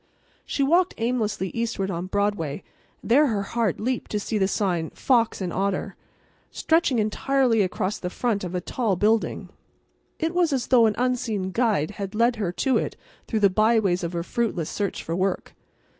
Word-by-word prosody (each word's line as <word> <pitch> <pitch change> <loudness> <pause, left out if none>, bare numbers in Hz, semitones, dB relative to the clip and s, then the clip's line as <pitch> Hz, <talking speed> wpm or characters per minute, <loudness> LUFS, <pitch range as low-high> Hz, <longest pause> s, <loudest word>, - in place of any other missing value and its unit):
She 280 - 0
walked 345 +6 +3
aimlessly 225 -5 -1
eastward 225 -4 -2
on 175 +1 -4
Broadway, 195 -6 -1 0.4
and - - -5
there 290 +5 +6
her 210 -5 -1
heart 225 -2 -1
leaped 250 +3 -2
to 210 - -1
see 210 +1 -2
the 190 - +3
sign, 180 -5 -1
"Fox 230 -6 +1
& 180 - -3
Otter," 195 0 -1 0.5
stretching 320 -6 +1
entirely 230 +2 +2
across 185 +1 -1
the 180 - -3
front 215 0 -1
of 180 0 -4
a 180 - -1
tall 220 +1 -1
building. 215 +4 0 0.7
It 325 +1 -1
was 345 -4 +2
as 255 -3 0
though 240 -3 +6
an 210 - 0
unseen 235 -6 -1
guide 215 -8 +1
had 200 0 -6
led 235 +2 +2
her 200 -5 -1
to 260 +8 +1
it - - -4 0.3
through 220 -2 -1
the 200 - +6
by 220 +4 +4
ways 185 -4 0
of 170 +1 -3
her 170 -1 -2
fruitless 190 -6 -2
search 200 -3 -3
for 165 - -3
work. 185 +1 -1
215 Hz, 185 wpm, -24 LUFS, 190-240 Hz, 0.7 s, there